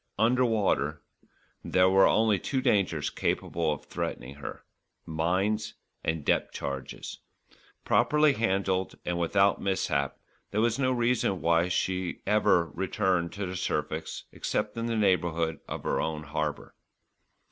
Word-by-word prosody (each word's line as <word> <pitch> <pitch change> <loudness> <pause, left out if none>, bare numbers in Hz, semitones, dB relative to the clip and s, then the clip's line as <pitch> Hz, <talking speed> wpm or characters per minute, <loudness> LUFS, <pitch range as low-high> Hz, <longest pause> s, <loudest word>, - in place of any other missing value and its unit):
Under 120 +4 +3
water 95 - +1 0.6
there 90 0 +3
were 95 +1 +6
only 110 -3 +3
two 135 +9 -1
dangers 100 - +1
capable 80 -2 -1
of 75 - -5
threatening 65 +3 -4
her 70 - -8 0.4
mines 95 +7 0 0.3
and 80 -2 -2
depth - - +1
charges. 70 -1 -5 0.7
Properly 150 -1 +4
handled 95 -5 0
and 85 0 -1
without 95 +4 +3
mishap, 75 -8 0 0.3
there 105 - -1
was 115 +3 +2
no 130 -1 +2
reason 120 -6 +1
why 85 +1 +3
she 90 0 -1
should - - -23
ever 105 -5 +3
return 90 -2 0
to 100 +2 -5
the 90 0 -5
surface 90 - -3
except - - -2
in 115 0 -2
the 115 -1 -1
neighbourhood 85 -5 +1
of - - -5
her - - 0
own 80 -1 -3
harbour. 75 0 -3
95 Hz, 135 wpm, -28 LUFS, 80-110 Hz, 0.7 s, were